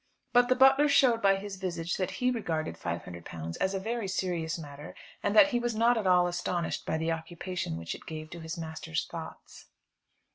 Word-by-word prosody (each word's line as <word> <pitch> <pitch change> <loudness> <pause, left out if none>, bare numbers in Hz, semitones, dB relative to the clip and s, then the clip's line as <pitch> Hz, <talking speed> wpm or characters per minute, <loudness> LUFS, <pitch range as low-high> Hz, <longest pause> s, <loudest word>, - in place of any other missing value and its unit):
But 245 0 +5
the 255 - +5
butler 270 +3 +6
showed 250 -5 +4
by 195 -1 +5
his 195 0 -6
visage 175 -3 -3
that 185 - -1
he 250 0 0
regarded 165 - -2
£500 85 -1 -6
as 190 +1 +1
a - - 0
very 225 +1 -3
serious 175 -4 -1
matter, 145 -2 -9 0.3
and 200 - 0
that 285 +7 +8
he 245 -4 +1
was 240 -1 -1
not 230 +2 +4
at 215 -4 -1
all 180 -1 +5
astonished 175 -1 -2
by 160 - 0
the 160 +1 -1
occupation 170 - -4
which 85 0 -4
it - - -12
gave 155 -1 -7
to 175 - -7
his 160 0 -6
master's 160 - -3
thoughts. - - -9
180 Hz, 195 wpm, -29 LUFS, 160-225 Hz, 0.3 s, that